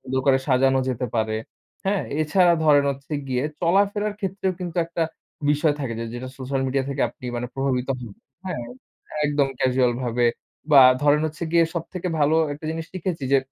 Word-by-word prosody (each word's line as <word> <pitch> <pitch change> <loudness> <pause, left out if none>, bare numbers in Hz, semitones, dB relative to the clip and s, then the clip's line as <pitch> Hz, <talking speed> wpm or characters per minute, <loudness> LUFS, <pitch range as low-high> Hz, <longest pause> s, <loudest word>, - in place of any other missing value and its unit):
সুন্দর 130 0 -2
করে 135 -1 +5
সাজানো 135 0 +3
যেতে 125 0 -2
পারে। 110 -1 0 0.5
হ্যা? 200 +1 +1 0.2
এছাড়া 175 +3 +4
ধরেন 145 -2 +5
হচ্ছে 140 +2 -8 0.2
গিয়ে 125 +1 0 0.2
চলাফেরার 200 +4 +2
ক্ষেত্রেও 190 -1 -1
কিন্তু 175 -2 -5
একটা 165 0 -2 0.5
বিষয় 150 +1 +3
থাকে 130 -4 -3
যে, 115 - -3
যেটা 125 +1 -5
সোশ্যাল 135 +1 -2
মিডিয়া 135 +1 0
থেকে 140 0 -1
আপনি 120 - -16 0.3
প্রভাবিত 135 -2 -1
হন 120 -4 -8 0.3
হ্যা? 185 - -3 0.7
একদম 145 -2 +2
ক্যাজুয়াল 125 -1 +2
ভাবে 120 0 +1 0.5
বা, 140 - +10 0.2
ধরেন 145 +1 +4
হচ্ছে 155 +2 -7
গিয়ে 170 -1 +5
সবথেকে 175 +2 -4
ভালো 150 +2 +3 0.2
একটা 145 +2 -9
জিনিস 160 0 -4
শিখেছি 180 -5 -3
যে 140 - +7
145 Hz, 170 wpm, -23 LUFS, 130-170 Hz, 0.7 s, বা